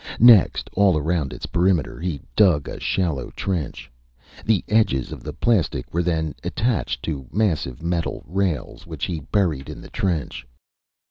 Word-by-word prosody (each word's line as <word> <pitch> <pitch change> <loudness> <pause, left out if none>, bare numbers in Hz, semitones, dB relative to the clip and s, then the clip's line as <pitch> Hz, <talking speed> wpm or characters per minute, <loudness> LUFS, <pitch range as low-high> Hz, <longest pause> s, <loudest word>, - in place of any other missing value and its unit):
Next, 115 -5 +6
all 95 -4 +4
around 75 -2 -1
its - - -6
perimeter, 85 -6 +1
he 85 -4 -3 0.2
dug 90 -9 +4
a - - -6
shallow 85 -8 -1
trench. 85 -9 -3 0.5
The 110 -3 +2
edges 105 - +2
of - - -7
the - - -6
plastic 95 - 0
were 85 - +2
then 80 -3 -1
attached 85 - -1
to 70 -5 -4
massive 80 - -1
metal 85 -1 -2
rails, 90 -2 -2
which - - -4
he 85 -3 -3
buried 80 -3 -1
in - - -7
the - - -12
trench. 85 -9 -2
85 Hz, 150 wpm, -23 LUFS, 75-95 Hz, 0.5 s, Next